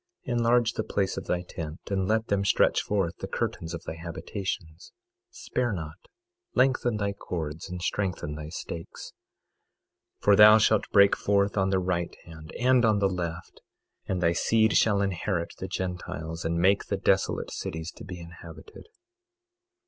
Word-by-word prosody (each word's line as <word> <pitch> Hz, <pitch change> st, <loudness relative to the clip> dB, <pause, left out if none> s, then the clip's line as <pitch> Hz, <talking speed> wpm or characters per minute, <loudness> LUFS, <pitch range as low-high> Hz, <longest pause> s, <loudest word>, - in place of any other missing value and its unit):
22:2 125 Hz, -, -1 dB
Enlarge 120 Hz, -1 st, +3 dB
the 110 Hz, -, -2 dB
place 95 Hz, -2 st, -1 dB
of -, -, -5 dB
thy 90 Hz, 0 st, 0 dB
tent, 80 Hz, -2 st, -7 dB
and 95 Hz, -1 st, 0 dB
let 110 Hz, +1 st, +1 dB
them 100 Hz, -2 st, 0 dB
stretch 100 Hz, -, +3 dB
forth 95 Hz, -5 st, -1 dB
the -, -, -6 dB
curtains 80 Hz, -1 st, -3 dB
of 85 Hz, -1 st, -6 dB
thy -, -, -5 dB
habitations; 85 Hz, 0 st, -6 dB, 0.4 s
spare 125 Hz, -, -2 dB
not, 80 Hz, -5 st, -7 dB, 0.5 s
lengthen 130 Hz, -3 st, +2 dB
thy 100 Hz, -1 st, -1 dB
cords 80 Hz, -3 st, -5 dB
and 90 Hz, 0 st, -6 dB
strengthen 90 Hz, -8 st, -2 dB
thy 75 Hz, 0 st, -7 dB
stakes; 80 Hz, 0 st, -7 dB, 1.1 s
22:3 -, -, -30 dB
For 105 Hz, -, +6 dB
thou 105 Hz, +1 st, +9 dB
shalt 110 Hz, -1 st, +2 dB
break 100 Hz, -1 st, +6 dB
forth 100 Hz, 0 st, +1 dB
on 95 Hz, -1 st, +2 dB
the 95 Hz, -, +2 dB
right 90 Hz, -2 st, -1 dB
hand 80 Hz, -1 st, -11 dB
and 125 Hz, 0 st, +4 dB
on 110 Hz, -2 st, +4 dB
the 100 Hz, -1 st, +3 dB
left, 85 Hz, -2 st, -5 dB, 0.5 s
and 90 Hz, -2 st, -1 dB
thy 85 Hz, 0 st, +3 dB
seed 110 Hz, +4 st, +2 dB
shall 100 Hz, -2 st, +4 dB
inherit 90 Hz, -2 st, -2 dB
the -, -, -4 dB
Gentiles 85 Hz, -3 st, -4 dB
and 85 Hz, +1 st, -1 dB
make 95 Hz, +4 st, +3 dB
the -, -, -2 dB
desolate -, -, +1 dB
cities 80 Hz, +1 st, -5 dB
to -, -, -12 dB
be 90 Hz, -1 st, -8 dB
inhabited. 85 Hz, -, -12 dB
95 Hz, 165 wpm, -27 LUFS, 85-105 Hz, 1.1 s, thou